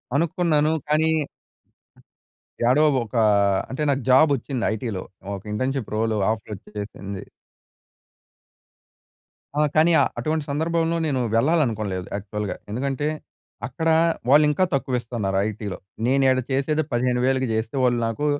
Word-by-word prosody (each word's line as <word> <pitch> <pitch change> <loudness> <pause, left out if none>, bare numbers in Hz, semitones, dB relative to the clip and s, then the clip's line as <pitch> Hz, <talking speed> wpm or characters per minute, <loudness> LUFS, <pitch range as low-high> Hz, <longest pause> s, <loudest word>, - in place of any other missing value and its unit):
అనుకున్నాను. 160 -1 +2 0.2
కానీ 155 +1 +3 1.6
యాడో 130 +6 +4 0.2
ఒక 110 - -14 0.6
అంటే, 135 +4 -5
నాకు 140 -1 +1
జాబ్ 145 +4 +6
వచ్చింది 130 -1 -4
ఐటీ‌లో. 110 -4 -4 0.3
ఒక 95 - -9
ఇంటర్న్‌షిప్ 130 +1 -2
రోల్ 110 0 0 0.2
ఆఫర్ 110 -1 -5
వచ్చేసింది. 100 -1 -8 2.3
ఆ! - - +4
కానీ 160 +2 +5 0.3
అటువంటి 155 -1 -1
సందర్భంలో 165 +2 0
నేను 135 -4 0 0.2
వెళ్ళాలనుకోలేదు 110 - +1
యాక్చువల్‌‌గా. 105 +1 -4 0.2
ఎందుకంటే, 135 +4 -2 0.6
అక్కడ 160 +6 -2 0.4
వాళ్ళు 150 +2 +7
ఇంకా 150 +5 +1
తక్కువ 130 -2 0
ఇస్తున్నారు 105 -5 -2
ఐటీ‌లో. 105 -3 -5 0.3
నేను 135 +1 +3
ఈడ 130 - +3
చేసేదే 150 +4 +1
15000కి 125 +1 +1
చేస్తే 110 +3 -2
వాళ్ళు 120 -1 +2
నాకు 115 +6 -3
130 Hz, 115 wpm, -23 LUFS, 110-150 Hz, 2.3 s, వాళ్ళు